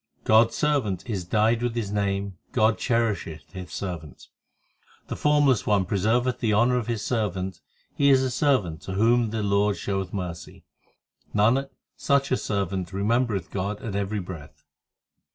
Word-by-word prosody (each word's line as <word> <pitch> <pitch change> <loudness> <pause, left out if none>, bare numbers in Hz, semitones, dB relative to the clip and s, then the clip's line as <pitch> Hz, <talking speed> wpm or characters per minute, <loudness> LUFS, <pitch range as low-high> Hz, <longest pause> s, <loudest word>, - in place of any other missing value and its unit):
God 110 +1 +6
s 115 - -10
servant 135 -12 0
is 100 -7 -3
dyed 110 +5 +2
with 120 -1 -1
His 110 -4 -2
name, 100 -2 -2
God 110 -2 +3
cherisheth 105 -10 -1
His 90 -4 -8
servant, 85 -7 -6 0.8
The - - -3
Formless 145 -5 +3
One 100 -3 +3
preserveth 115 +7 +1
the 110 -4 +1
honour 120 +3 +3
of 120 - -2
His 115 -3 -2
servant 95 -5 -2 0.3
He 140 0 +3
is 135 -1 +5
a 130 - -1
servant 120 - +1
to 95 - -6
whom 115 +3 +3
the 110 0 -2
Lord 100 0 +2
showeth 95 -2 -3
mercy; 90 -5 -6 0.7
Nanak, 120 +7 +3 0.3
such 140 0 +1
a 130 - +3
servant 95 -3 -2
remembereth 105 -1 0
God 100 +2 -3
at 105 -3 -4
every 100 +1 -1
breath. 85 -6 -9
105 Hz, 155 wpm, -25 LUFS, 95-120 Hz, 0.8 s, God